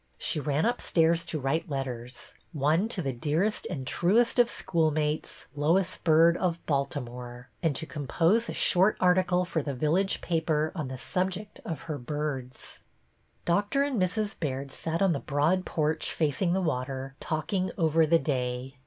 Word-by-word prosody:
She - - +1
ran 145 +3 0
upstairs 170 -8 +2
to 160 -2 -2
write 160 +6 -1
letters, 125 -3 -5
— - - -35
one 155 +7 +2
to 195 -7 -2
the 135 -2 -2
dearest 160 - 0
and 135 -2 -4
truest 220 - +2
of 240 -1 +5
schoolmates, 155 -5 -1
Lois 165 +6 +2
Byrd, 165 +1 +4
of 175 -2 0
Baltimore, 125 -3 -3
— - - -40
and 160 -4 +1
to 160 - -3
compose 165 - +1
a - - -3
short 190 +4 +4
article 180 0 +3
for 165 -2 -1
the 140 -1 -4
village 165 +9 +1
paper 160 -2 0
on 155 -7 -4
the 130 0 -6
subject 185 +8 -3
of 165 - -5
her 155 -3 -5
birds. 135 -1 -5 0.7
Doctor 205 +10 +2
and 270 -8 -1
Mrs. 205 +3 0
Baird 140 -3 -3
sat 165 +6 -1
on 190 -3 +3
the 140 - -2
broad 155 +7 +1
porch 155 0 -1
facing 165 +3 0
the 190 - +1
water, 135 -4 -3
talking 180 +4 -1
over 160 -2 +3
the 165 +2 +5
day. 130 -3 -3
160 Hz, 165 wpm, -28 LUFS, 140-180 Hz, 0.7 s, of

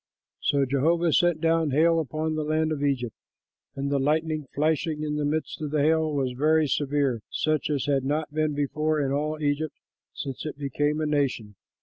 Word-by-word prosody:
'" - - -67
So 140 -1 +3
Jehovah 160 +5 +2
sent 175 -3 +3
down 165 -1 +2
hail 165 +4 +3
upon 155 +1 -2
the 155 0 -1
land 155 +1 0
of 145 -2 -2
Egypt, 125 -5 -1 0.6
and 140 +1 -2
the 140 - +2
lightning 155 +1 0
flashing 155 +1 0
in 150 0 -2
the 150 - 0
midst 155 +2 -2
of 150 - -2
the 150 -1 +1
hail 160 0 +2
was 135 -3 0
very 155 +5 +3
severe, 140 -4 0
such 155 -2 0
as 145 -3 0
had 140 -2 +1
not 150 +2 -2
been 155 -1 0
before 150 +2 0
in 135 -2 0
all 150 +2 -1
Egypt 145 +1 -1 0.4
since 135 -2 -6
it 155 - -5
became 145 +2 -1
a - - 0
nation. 140 -8 -1
150 Hz, 195 wpm, -26 LUFS, 140-155 Hz, 0.6 s, So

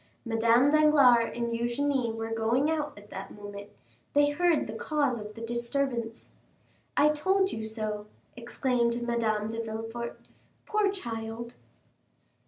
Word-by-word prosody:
Madame 230 +4 +4
Danglars 285 -6 +5
and 235 0 -1
Eugénie 240 +1 0
were 225 0 -5
going 235 +7 +1
out 300 -2 -1
at 205 0 -14
that 195 0 -7
moment; 205 0 -9 0.4
they 290 0 +4
heard 340 +1 +2
the 215 - -6
cause 280 0 0
of 210 0 -8
the 225 - -9
disturbance. 235 0 -2 0.7
"I 295 - +6
told 380 +6 +2
you 220 0 -4
so!" 215 -1 -3 0.3
exclaimed 240 0 0
Madame 220 -3 0
de 225 0 -3
Villefort. 225 +2 -5 0.5
"Poor 425 -2 +2
child!" 230 - -6
235 Hz, 130 wpm, -29 LUFS, 225-285 Hz, 0.7 s, I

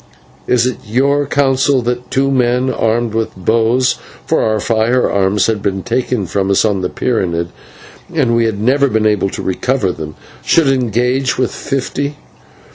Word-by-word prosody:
"It - - +1
is 125 +1 +2
your 140 +6 +1
counsel 135 -1 +2
that 125 +1 -3
two 135 +1 +1
men 125 0 +1
armed 115 0 0
with 115 0 -2
bows" 115 +6 +1 0.3
(for - - +1
our 110 -1 +1
firearms 110 -3 +1
had 110 -2 0
been 95 -1 -2
taken 120 -3 -1
from 95 +2 -1
us 100 +2 +3
on 100 -3 0
the 90 - -1
pyramid, 85 -8 -1 0.6
and 135 -8 +1
we 115 0 +2
had 110 -3 -1
never 135 +6 +3
been 110 -4 0
able 105 -2 +2
to - - -6
recover 100 +2 0
them) 80 -2 -7 0.3
"should 160 -5 +3
engage 125 +1 0
with 130 -2 0
fifty. 140 +1 -3
120 Hz, 160 wpm, -15 LUFS, 105-130 Hz, 0.6 s, us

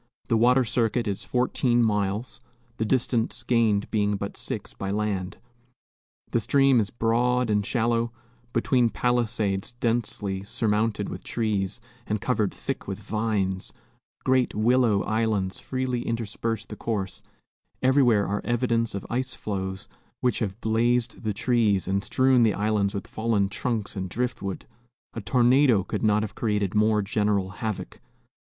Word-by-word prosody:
The 115 - +3
water 125 +3 +4
circuit 115 +1 0
is 100 -2 -3
fourteen 125 -1 +2
miles, 105 +3 -1 0.4
the 110 - 0
distance 120 -1 0
gained 110 -4 +2
being 105 -1 +1
but 100 0 -5
six - - -5
by 95 - -5
land. 100 -3 -2 0.9
The - - +2
stream 135 +2 +4
is 105 -2 0
broad 120 +1 +1
and 105 -1 +2
shallow, 115 +1 0 0.4
between 120 +1 +2
palisades 110 -1 0
densely 115 -5 -1
surmounted 105 -1 0
with - - -7
trees 105 -2 -1 0.3
and 105 0 -1
covered 110 -3 0
thick - - -5
with - - -3
vines; 105 -4 -2 0.5
great 130 -1 +2
willow 115 -1 +3
islands 110 -4 0
freely 130 -2 -2
intersperse 115 -1 -3
the 105 - -8
course; 100 -4 -3 0.6
everywhere 130 -6 +4
are 105 +1 -1
evidences 115 -2 0
of 100 - -5
ice 125 +1 -2
floes, 95 -2 -4 0.3
which 125 - +1
have 105 -2 -3
blazed 115 +2 +1
the 110 - -1
trees 105 -3 +1
and 100 +1 0
strewn 130 +4 +3
the 110 -3 +3
islands 105 -1 0
with 100 - -4
fallen 110 -3 0
trunks 110 0 -3
and 95 -2 -3
driftwood, 105 -3 -3 0.5
a 115 - -5
tornado 125 -1 +4
could - - -4
not 105 -1 +3
have 110 - -5
created 105 -4 -1
more 105 0 +3
general 100 -2 0
havoc. 110 -2 -5
110 Hz, 140 wpm, -26 LUFS, 100-120 Hz, 0.9 s, water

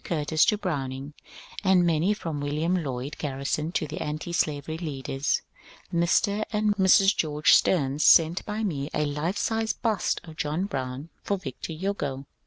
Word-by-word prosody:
Curtis 155 -1 +1
to 210 - +2
Browning, 140 -6 -4 0.5
and 190 -2 +4
many 170 +5 +2
from 160 -7 -4
William 155 +5 0
Lloyd 135 +1 -4
Garrison 145 +2 -2
to 160 - 0
the 150 +1 -6
antislavery 155 0 -2
leaders. 140 -3 -2 0.5
Mr. 200 +5 +2
and 210 -1 +1
Mrs. 195 +1 +5
George 150 -1 +3
Steams 145 -4 +3
sent 165 +2 +5
by 215 +1 -3
me 145 -8 -2
a 150 - +1
life 150 +7 -2
sized 225 +1 -1
bust 220 -6 +1
of 160 -2 -12
John 155 +5 -1
Brown 135 -3 -5
for 200 - -1
Victor 155 -1 -7
Hugo. 155 -6 -3
155 Hz, 150 wpm, -26 LUFS, 145-190 Hz, 0.5 s, Mrs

